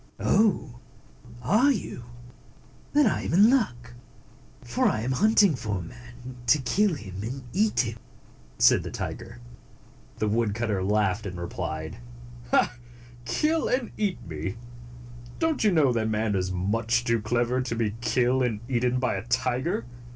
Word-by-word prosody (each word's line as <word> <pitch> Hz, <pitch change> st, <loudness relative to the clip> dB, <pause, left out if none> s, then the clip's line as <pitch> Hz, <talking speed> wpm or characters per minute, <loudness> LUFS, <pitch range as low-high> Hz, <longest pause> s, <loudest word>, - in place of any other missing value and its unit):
"Oh! 150 Hz, -, +1 dB, 0.6 s
Are 220 Hz, -, +4 dB
you? 180 Hz, -, -4 dB, 0.9 s
Then 295 Hz, 0 st, +5 dB
I 220 Hz, -, +1 dB
am -, -, -2 dB
in 205 Hz, +7 st, +6 dB
luck; 125 Hz, -, 0 dB, 0.7 s
for -, -, +1 dB
I 110 Hz, -, 0 dB
am 125 Hz, +3 st, -2 dB
hunting 205 Hz, -, +4 dB
for 105 Hz, -5 st, -3 dB
a -, -, -4 dB
man, 125 Hz, +6 st, -11 dB
to 135 Hz, -, +6 dB
kill 190 Hz, +7 st, +1 dB
him 95 Hz, -7 st, -8 dB
and 130 Hz, +5 st, -5 dB
eat 210 Hz, +2 st, +2 dB
him," 115 Hz, -2 st, -4 dB, 0.6 s
said -, -, +5 dB
the -, -, -6 dB
tiger. -, -, -6 dB, 0.8 s
The 110 Hz, -, 0 dB
woodcutter 105 Hz, -2 st, 0 dB
laughed, 105 Hz, +1 st, +1 dB
and 90 Hz, -2 st, -6 dB
replied, 85 Hz, -6 st, -5 dB, 1.3 s
"Kill 315 Hz, -, +1 dB
and 250 Hz, -2 st, -1 dB
eat 205 Hz, -4 st, -1 dB
me? 80 Hz, +5 st, -5 dB, 0.8 s
Don't 325 Hz, -5 st, 0 dB
you 210 Hz, -, +4 dB
know 150 Hz, -7 st, +3 dB
that 110 Hz, -1 st, 0 dB
man 110 Hz, 0 st, 0 dB
is 95 Hz, -1 st, -1 dB
much 115 Hz, +6 st, 0 dB
too 115 Hz, -2 st, +1 dB
clever 120 Hz, +3 st, 0 dB
to 125 Hz, -2 st, -3 dB
be 110 Hz, -3 st, -1 dB
killed 125 Hz, +1 st, +2 dB
and 115 Hz, -4 st, 0 dB
eaten 125 Hz, 0 st, +1 dB
by 125 Hz, -, 0 dB
a 95 Hz, +4 st, -5 dB
tiger? 125 Hz, +2 st, 0 dB
120 Hz, 150 wpm, -26 LUFS, 110-160 Hz, 1.3 s, in